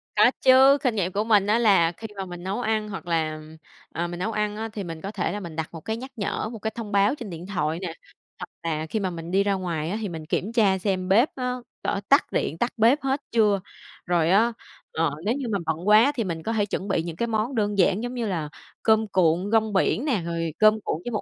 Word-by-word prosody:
Có - - +6
chứ, 265 +2 +7
kinh 250 -5 +1
nghiệm 185 -3 0
của 205 +3 0
mình 210 -3 +3
á 215 +3 +3
là 195 -8 +4
khi 220 +6 -9
mà 195 - -3
mình 175 -1 -9
nấu 195 +6 -2
ăn, 215 -2 -1
hoặc 195 -3 -7
là 155 -2 -1 0.5
ờ, 170 +2 -2
mình 175 0 -6
nấu 220 +5 -1
ăn 210 -1 -1
á 225 +1 -4
thì 205 - -4
mình 165 -3 -7
có 195 - -5
thể 205 -4 -2
là 205 - -4
mình 170 -5 -8
đặt 160 -1 -3
một 165 - -8
cái 220 +7 -3
nhắc 260 +3 -8
nhở, 215 0 -2
một 230 - -8
cái 220 +1 -3
thông 225 -3 -6
báo 200 +6 +3
trên 235 -7 -8
điện 170 0 -7
thoại 165 -5 -1
nè, 175 -4 -4 0.5
hoặc 180 - -7
là 160 -1 -2
khi 220 - -1
mà 190 - -1
mình 170 -1 -7
đi 195 +2 +3
ra 200 0 +1
ngoài 170 -5 -2
á 210 - -2
thì 210 - -3
mình 160 -2 -7
kiểm 190 +6 -2
tra 205 -5 +3
xem 185 -1 -2
bếp 230 +9 +5
á, 250 -1 -2 0.3
có 200 - -1
tắt 280 - +4
điện, 160 - -1
tắt 240 +7 -1
bếp 235 +7 +4
hết 270 +1 -1
chưa. 210 -3 +3 0.5
Rồi 170 -2 +2
á, 225 +6 +4 0.4
ờ, 160 -1 0
nếu 220 - +2
như 275 - -4
mà 200 - +1
bận 160 +3 -3
quá 220 +6 +6
thì 230 - 0
mình 165 -4 -4
có 225 - -2
thể 210 -2 +1
chuẩn 195 -1 -4
bị 180 -4 0
những 170 -1 -6
cái 235 +7 -1
món 225 +3 -1
đơn 205 -2 0
giản 190 +3 +3
giống 245 +1 -4
như 235 -3 -2
là 165 -6 -2 0.3
cơm 220 0 +3
cuộn 185 +1 +1
rong 220 -1 +2
biển 215 +7 +1
nè, 245 -10 +1
rồi 165 -1 -2
cơm 215 0 +5
cuộn 155 - -2
với 240 - -3
một 215 - -1
200 Hz, 265 wpm, -25 LUFS, 175-220 Hz, 0.5 s, chứ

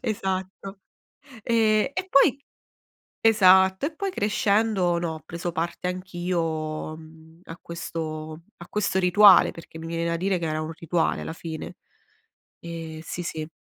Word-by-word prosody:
Esatto. 195 -2 -4 0.6
E 220 +1 +2
e 375 0 -2
poi 275 -4 +4 0.8
esatto, 190 0 +5
e 315 - -5
poi 390 +4 -3
crescendo 205 - +1
no, 170 -2 -2
ho 160 - -9
preso 170 +1 -4
parte 170 +2 -3
anch'io, 170 -4 -3
mhmm, 160 +1 -16
a 165 - -9
questo 155 -1 -6
a 175 - -12
questo 205 -2 0
rituale, 190 +1 +7
perché 165 -1 -12
mi 165 - -7
viene 165 0 -2
da 170 - 0
dire 185 +2 0
che 170 - -3
era 155 0 -2
un 155 +1 -5
rituale 165 0 -1
alla - - -5
fine. 160 -1 -7 0.8
Ehm 165 -2 -7
sì, 175 +2 -6
sì. 155 -2 -5
175 Hz, 145 wpm, -25 LUFS, 160-195 Hz, 0.8 s, rituale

